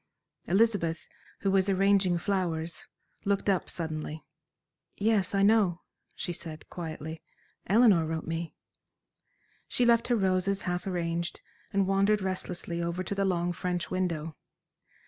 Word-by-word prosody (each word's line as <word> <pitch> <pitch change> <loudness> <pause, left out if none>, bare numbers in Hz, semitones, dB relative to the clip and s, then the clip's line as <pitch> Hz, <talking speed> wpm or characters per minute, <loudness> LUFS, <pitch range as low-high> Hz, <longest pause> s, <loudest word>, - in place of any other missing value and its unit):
Elizabeth, 190 -4 +2 0.3
who 195 - +1
was 195 0 +3
arranging 195 -2 +3
flowers, 170 -4 -2 0.4
looked 200 0 0
up 195 -3 +1
suddenly. 155 -1 -3 0.7
"Yes, 205 -3 +2
I 195 - +3
know," 200 -5 +4 0.3
she 175 - -3
said, 160 -2 -8
quietly, 160 -2 -6 0.5
"Eleanor 200 -5 +5
wrote 160 0 -3
me." 165 0 -4 1.1
She 245 - +1
left 235 -1 +4
her 245 - +3
roses 190 -1 +1
half 180 +1 -2
arranged, 170 -1 -2 0.3
and 200 -2 +2
wandered 195 +2 +2
restlessly 180 -2 -3
over 170 +2 -2
to 185 - -3
the 195 0 0
long 175 -2 0
French 180 -1 -3
window. 165 -4 -2
185 Hz, 125 wpm, -29 LUFS, 170-195 Hz, 1.1 s, Eleanor